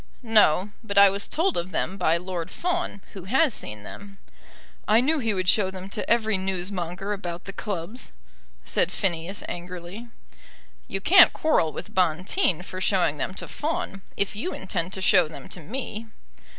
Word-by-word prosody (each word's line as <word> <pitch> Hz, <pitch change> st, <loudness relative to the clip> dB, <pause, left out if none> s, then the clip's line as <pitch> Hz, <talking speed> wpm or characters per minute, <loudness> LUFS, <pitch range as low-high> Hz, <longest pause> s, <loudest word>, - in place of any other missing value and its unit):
"No; 210 Hz, -4 st, +4 dB
but 200 Hz, -2 st, -4 dB
I 200 Hz, -1 st, +9 dB
was 200 Hz, +1 st, -2 dB
told 345 Hz, +4 st, +1 dB
of 175 Hz, +2 st, -2 dB
them 185 Hz, +2 st, -1 dB
by 170 Hz, -3 st, +2 dB
Lord 180 Hz, -1 st, -4 dB
Fawn, 350 Hz, -, -2 dB
who 190 Hz, -3 st, -8 dB
has 265 Hz, +6 st, +3 dB
seen 105 Hz, -, -5 dB
them." 200 Hz, -, -10 dB, 0.7 s
"I 215 Hz, +2 st, +5 dB
knew 300 Hz, +5 st, +2 dB
he 225 Hz, -4 st, 0 dB
would 185 Hz, -1 st, -2 dB
show 190 Hz, 0 st, +4 dB
them 190 Hz, +1 st, -8 dB
to 210 Hz, -, -3 dB
every 220 Hz, -4 st, +2 dB
newsmonger 190 Hz, +1 st, -3 dB
about 175 Hz, -4 st, -6 dB
the 195 Hz, -, -7 dB
clubs," 200 Hz, +4 st, -5 dB, 0.5 s
said -, -, +1 dB
Phineas 180 Hz, 0 st, -2 dB
angrily. 180 Hz, +5 st, -7 dB, 0.8 s
"You 195 Hz, -, -4 dB
can't 365 Hz, -, +8 dB
quarrel 305 Hz, -, +2 dB
with -, -, -8 dB
Bonteen 180 Hz, -, +1 dB
for 185 Hz, 0 st, -7 dB
showing 180 Hz, -7 st, +2 dB
them 185 Hz, -, -3 dB
to -, -, -6 dB
Fawn, 295 Hz, -10 st, -3 dB, 0.2 s
if 200 Hz, +1 st, 0 dB
you 300 Hz, -, -3 dB
intend 185 Hz, -2 st, -3 dB
to 190 Hz, -, -5 dB
show 180 Hz, -, +5 dB
them 155 Hz, -, -10 dB
to 185 Hz, -, -6 dB
me." 225 Hz, -, -6 dB
190 Hz, 170 wpm, -25 LUFS, 180-220 Hz, 0.8 s, I